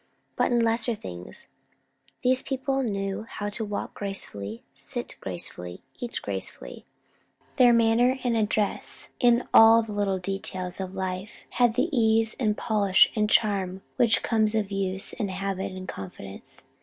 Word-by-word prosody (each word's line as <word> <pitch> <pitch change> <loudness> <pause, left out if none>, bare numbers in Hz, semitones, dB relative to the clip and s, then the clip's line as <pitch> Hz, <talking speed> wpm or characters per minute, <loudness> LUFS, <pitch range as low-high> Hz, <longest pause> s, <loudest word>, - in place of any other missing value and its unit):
But - - +1
in 240 - +3
lesser 230 +1 +2
things! 90 - -9 0.8
These 255 +1 +3
people 270 0 -1
knew 200 -2 -3
how 205 0 -4
to 215 +2 -2
walk 205 -1 -4
gracefully, 115 - -5
sit - - -5
gracefully, 90 0 -6 0.2
eat 240 -1 -4
gracefully. - - -5 0.7
Their 250 -2 +7
manner 235 +2 +4
and 240 -2 +1
address 210 -1 -1
in 240 -1 +3
all 225 +1 +8
the 220 - -8
little 200 -2 0
details 185 -1 -3
of 190 0 -6
life, 190 +1 -5
had 240 -2 +2
the - - +2
ease, 225 -1 +3
and 215 -4 +1
polish, 200 -4 +4
and 210 -1 +1
charm 195 -4 +1
which 235 -3 +3
comes 220 -1 +1
of 210 -2 -1
use, 195 0 -2
and 210 -5 -3
habit, 190 0 -3
and 185 0 -8
confidence. 95 - -9
210 Hz, 145 wpm, -26 LUFS, 190-230 Hz, 0.8 s, all